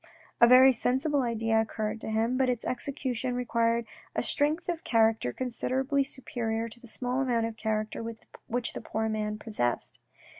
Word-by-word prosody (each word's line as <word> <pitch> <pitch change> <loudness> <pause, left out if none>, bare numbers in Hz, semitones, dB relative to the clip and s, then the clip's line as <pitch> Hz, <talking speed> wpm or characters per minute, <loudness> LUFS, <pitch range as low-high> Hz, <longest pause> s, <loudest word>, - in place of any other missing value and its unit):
A 235 - +9
very 255 +2 +8
sensible 265 +4 +1
idea 225 -2 +1
occurred 220 0 -3
to - - -5
him, 225 +3 +1
but 260 -1 +2
its 245 -2 -2
execution 255 -2 -2
required 235 -1 +1 0.3
a - - 0
strength 300 +3 0
of 340 -2 -2
character 225 - +2
considerably 260 - 0
superior 230 -4 -3
to 235 - -14
the 240 - -14
small 250 +3 -1
amount 240 -4 +1
of 225 -1 -4
character 215 0 -2 0.5
which 240 0 -2
the - - -6
poor 220 +1 -2
man 215 -1 -2
possessed. 165 - -2
235 Hz, 160 wpm, -29 LUFS, 220-255 Hz, 0.5 s, A